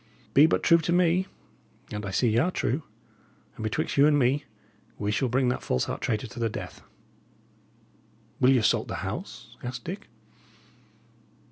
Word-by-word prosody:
Be 145 Hz, +3 st, +7 dB
but -, -, 0 dB
true 170 Hz, 0 st, +6 dB
to 165 Hz, +1 st, -2 dB
me 180 Hz, +1 st, +3 dB, 0.6 s
and 105 Hz, -1 st, -4 dB
I -, -, -3 dB
see 110 Hz, +6 st, +1 dB
y' -, -, +4 dB
are 165 Hz, +8 st, +2 dB
true 140 Hz, -5 st, -1 dB, 0.7 s
and -, -, -9 dB
betwixt 110 Hz, +5 st, -2 dB
you 140 Hz, +1 st, +7 dB
and 150 Hz, -1 st, +4 dB
me, 140 Hz, +2 st, +2 dB, 0.5 s
we 105 Hz, 0 st, -1 dB
shall 125 Hz, +4 st, 0 dB
bring 130 Hz, +1 st, +2 dB
that 125 Hz, -, -1 dB
false 65 Hz, -, 0 dB
heart -, -, -4 dB
traitor 110 Hz, +2 st, -1 dB
to 110 Hz, 0 st, -9 dB
the 115 Hz, -1 st, +1 dB
death." -, -, -7 dB, 1.6 s
"Will 125 Hz, -, +5 dB
ye 135 Hz, -, +5 dB
assault 110 Hz, -, +2 dB
the -, -, -4 dB
house?" -, -, -7 dB
asked 125 Hz, +1 st, -6 dB
Dick. 195 Hz, +5 st, -6 dB
130 Hz, 170 wpm, -27 LUFS, 115-160 Hz, 1.6 s, Be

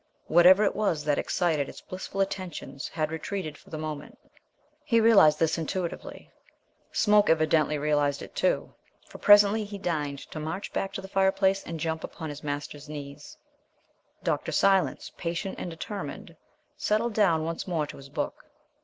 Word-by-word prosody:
Whatever 180 Hz, +5 st, +6 dB
it 200 Hz, -, +1 dB
was 185 Hz, -8 st, 0 dB
that 145 Hz, -1 st, +1 dB
excited 155 Hz, -6 st, 0 dB
its -, -, -10 dB
blissful 190 Hz, +1 st, -5 dB
attentions 180 Hz, -8 st, -4 dB
had 155 Hz, -1 st, -2 dB
retreated 160 Hz, 0 st, -4 dB
for -, -, -18 dB
the 155 Hz, -, -5 dB
moment. 155 Hz, -1 st, -6 dB, 0.7 s
He 245 Hz, -6 st, +3 dB
realized 200 Hz, -10 st, +6 dB
this 165 Hz, 0 st, +1 dB
intuitively. 170 Hz, +2 st, -5 dB, 0.6 s
Smoke 210 Hz, -1 st, +4 dB
evidently 155 Hz, -1 st, +3 dB
realized 145 Hz, -1 st, +1 dB
it, -, -, -11 dB
too, -, -, 0 dB, 0.3 s
for -, -, -12 dB
presently 205 Hz, +1 st, +6 dB
he 205 Hz, 0 st, -7 dB
deigned 150 Hz, -7 st, -2 dB
to 155 Hz, -, -5 dB
march 160 Hz, +6 st, -5 dB
back 195 Hz, -, -2 dB
to -, -, -4 dB
the 195 Hz, -, -9 dB
fireplace 195 Hz, 0 st, +2 dB
and 165 Hz, -1 st, -6 dB
jump 160 Hz, 0 st, -2 dB
upon 160 Hz, -, -6 dB
his 145 Hz, 0 st, -8 dB
master's 145 Hz, 0 st, -5 dB
knees. 145 Hz, -1 st, -9 dB, 0.9 s
Dr. -, -, -1 dB
Silence, 190 Hz, -8 st, +2 dB
patient 170 Hz, +3 st, -3 dB
and -, -, -4 dB
determined, 165 Hz, -2 st, -7 dB, 0.4 s
settled 220 Hz, +2 st, 0 dB
down 175 Hz, -7 st, +3 dB
once 165 Hz, +3 st, -4 dB
more 165 Hz, -4 st, 0 dB
to -, -, -10 dB
his 135 Hz, 0 st, -12 dB
book. 140 Hz, -, -4 dB
165 Hz, 160 wpm, -27 LUFS, 150-195 Hz, 0.9 s, Whatever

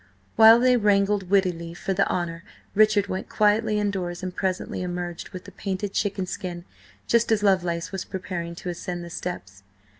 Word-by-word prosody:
While 225 Hz, +1 st, +8 dB
they 250 Hz, 0 st, +4 dB
wrangled 200 Hz, -3 st, +2 dB
wittily 175 Hz, -4 st, +1 dB
for 195 Hz, +2 st, -2 dB
the 195 Hz, +1 st, +1 dB
honour, 170 Hz, -1 st, -2 dB, 0.3 s
Richard 210 Hz, -1 st, +4 dB
went 190 Hz, -1 st, -5 dB
quietly 210 Hz, +1 st, +2 dB
indoors 185 Hz, -4 st, -2 dB
and 185 Hz, -1 st, -4 dB
presently 185 Hz, -1 st, -2 dB
emerged 175 Hz, -1 st, -4 dB
with 185 Hz, -, -8 dB
the 200 Hz, -, -11 dB
painted 195 Hz, +1 st, -4 dB
chicken 200 Hz, -2 st, -1 dB
skin, 175 Hz, -1 st, -6 dB, 0.4 s
just 235 Hz, -1 st, +2 dB
as 210 Hz, -2 st, +2 dB
Lovelace 175 Hz, -4 st, +1 dB
was 195 Hz, -2 st, -4 dB
preparing 175 Hz, -3 st, -5 dB
to 180 Hz, -, -6 dB
ascend 175 Hz, 0 st, -5 dB
the 170 Hz, -, -9 dB
steps. 100 Hz, -, -6 dB
185 Hz, 170 wpm, -25 LUFS, 175-205 Hz, 0.4 s, While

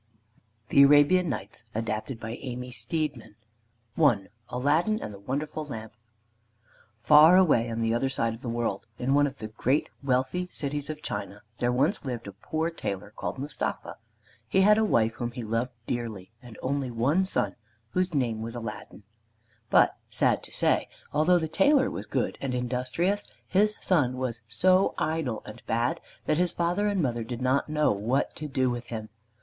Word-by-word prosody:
THE 140 Hz, -, +6 dB
ARABIAN 145 Hz, +5 st, +5 dB
NIGHTS 110 Hz, -4 st, -5 dB
ADAPTED 110 Hz, +2 st, -3 dB
BY 115 Hz, 0 st, -5 dB
AMY 125 Hz, -1 st, -5 dB
STEEDMAN 120 Hz, 0 st, -3 dB, 0.6 s
I 120 Hz, -11 st, +3 dB, 0.2 s
ALADDIN 155 Hz, -, +1 dB
AND 105 Hz, -, -6 dB
THE 100 Hz, -, -10 dB
WONDERFUL 150 Hz, +8 st, -3 dB
LAMP 110 Hz, -6 st, -7 dB, 1.0 s
Far 150 Hz, +9 st, +7 dB
away 145 Hz, -11 st, +4 dB
on 115 Hz, 0 st, -3 dB
the 115 Hz, 0 st, +1 dB
other 135 Hz, +3 st, +1 dB
side 115 Hz, -4 st, 0 dB
of 115 Hz, -, -10 dB
the 120 Hz, -, -4 dB
world, 115 Hz, -2 st, -2 dB
in 130 Hz, +2 st, 0 dB
one 145 Hz, 0 st, +4 dB
of 135 Hz, 0 st, -8 dB
the 110 Hz, 0 st, -6 dB
great 130 Hz, +6 st, 0 dB
wealthy 135 Hz, +7 st, 0 dB
cities 145 Hz, -1 st, -3 dB
of 155 Hz, -1 st, -6 dB
China, 100 Hz, 0 st, -5 dB, 0.2 s
there 120 Hz, 0 st, +2 dB
once 145 Hz, +11 st, +1 dB
lived 125 Hz, -4 st, -4 dB
a 100 Hz, -, -6 dB
poor 160 Hz, -, -3 dB
tailor 100 Hz, -, -5 dB
called -, -, -4 dB
Mustapha. 140 Hz, +1 st, -4 dB, 0.5 s
He 190 Hz, -, +3 dB
had 210 Hz, +2 st, +6 dB
a -, -, +3 dB
wife 115 Hz, -, +2 dB
whom 120 Hz, 0 st, -3 dB
he 125 Hz, -1 st, -5 dB
loved 115 Hz, +3 st, -1 dB, 0.2 s
dearly 115 Hz, -6 st, -4 dB
and 120 Hz, -4 st, -12 dB
an -, -, -14 dB
only 135 Hz, 0 st, -1 dB, 0.4 s
son 190 Hz, -, 0 dB, 0.4 s
whose 185 Hz, +5 st, +1 dB
name 115 Hz, -5 st, 0 dB
was 115 Hz, +1 st, -5 dB
Aladdin. 115 Hz, -2 st, -7 dB, 0.7 s
But, -, -, +5 dB
sad -, -, +2 dB
to -, -, -14 dB
say, -, -, +1 dB, 0.3 s
although 155 Hz, +5 st, +4 dB
the 160 Hz, -2 st, -1 dB
tailor 270 Hz, -, +3 dB
was -, -, -6 dB
good -, -, -1 dB
and 130 Hz, -2 st, -2 dB
industrious, 130 Hz, +11 st, -1 dB, 0.2 s
his 210 Hz, +2 st, +3 dB
son 135 Hz, -9 st, +2 dB
was 120 Hz, -3 st, -3 dB
so 185 Hz, -, +3 dB
idle 155 Hz, -8 st, -1 dB
and 105 Hz, -, -10 dB
bad 120 Hz, +9 st, 0 dB, 0.2 s
that 155 Hz, -, +1 dB
his 180 Hz, -1 st, +2 dB
father 175 Hz, +5 st, 0 dB
and 200 Hz, -4 st, +1 dB
mother 120 Hz, -3 st, -1 dB
did 120 Hz, +2 st, -5 dB
not 130 Hz, +4 st, +1 dB
know 150 Hz, 0 st, +2 dB
what 110 Hz, +7 st, 0 dB
to 155 Hz, -, -4 dB
do 130 Hz, -3 st, +1 dB
with 120 Hz, 0 st, -5 dB
him. 110 Hz, -2 st, -6 dB
130 Hz, 175 wpm, -27 LUFS, 115-155 Hz, 1.0 s, Far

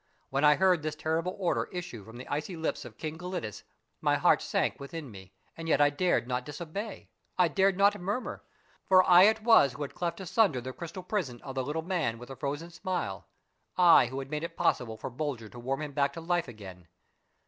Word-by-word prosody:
When 135 Hz, +2 st, 0 dB
I 150 Hz, 0 st, +7 dB
heard 185 Hz, -2 st, +3 dB
this 155 Hz, 0 st, -3 dB
terrible 165 Hz, +4 st, -1 dB
order 185 Hz, -3 st, 0 dB
issue 175 Hz, -, -6 dB
from 115 Hz, +3 st, -12 dB
the 125 Hz, -, -9 dB
icy 150 Hz, +5 st, -3 dB
lips 160 Hz, -5 st, -3 dB
of 115 Hz, -2 st, -11 dB
King 160 Hz, 0 st, -5 dB
Gelidus 180 Hz, -, -5 dB, 0.4 s
my -, -, +3 dB
heart -, -, +4 dB
sank -, -, -1 dB
within 140 Hz, -1 st, -7 dB
me, 95 Hz, -2 st, -12 dB, 0.2 s
and 165 Hz, 0 st, -6 dB
yet 150 Hz, -, +3 dB
I 145 Hz, 0 st, +5 dB
dared 175 Hz, -5 st, +1 dB
not 125 Hz, 0 st, -1 dB
disobey, 170 Hz, -, -7 dB, 0.3 s
I 180 Hz, -1 st, +5 dB
dared 190 Hz, +3 st, +2 dB
not 200 Hz, -1 st, +3 dB
murmur, 205 Hz, +7 st, -3 dB, 0.4 s
for 185 Hz, -1 st, +6 dB
I 180 Hz, +1 st, +8 dB
it 220 Hz, +1 st, +3 dB
was 220 Hz, -, +6 dB
who 145 Hz, -, -5 dB
had 140 Hz, -, -6 dB
cleft 175 Hz, +1 st, -3 dB
asunder 190 Hz, -, +2 dB
the 130 Hz, +1 st, -6 dB
crystal 170 Hz, +4 st, -7 dB
prison 170 Hz, -, -2 dB
of 135 Hz, -, -6 dB
the 130 Hz, 0 st, -1 dB
Little 150 Hz, +4 st, -3 dB
Man 165 Hz, -10 st, -1 dB
with 125 Hz, +2 st, -11 dB
the 135 Hz, -, -7 dB
Frozen 145 Hz, +4 st, -4 dB
Smile; 170 Hz, -, -4 dB, 0.5 s
1 175 Hz, -8 st, +7 dB
who 130 Hz, +2 st, -6 dB
had 135 Hz, +1 st, -6 dB
made 150 Hz, +1 st, -2 dB
it 170 Hz, 0 st, -6 dB
possible 110 Hz, -3 st, 0 dB
for 110 Hz, -, -6 dB
Bulger 125 Hz, -5 st, -4 dB
to 120 Hz, -, -11 dB
warm 135 Hz, +5 st, -2 dB
him 150 Hz, -, -5 dB
back 140 Hz, 0 st, +1 dB
to 165 Hz, -, -7 dB
life 175 Hz, 0 st, 0 dB
again. 95 Hz, -7 st, -11 dB
155 Hz, 215 wpm, -29 LUFS, 130-180 Hz, 0.5 s, I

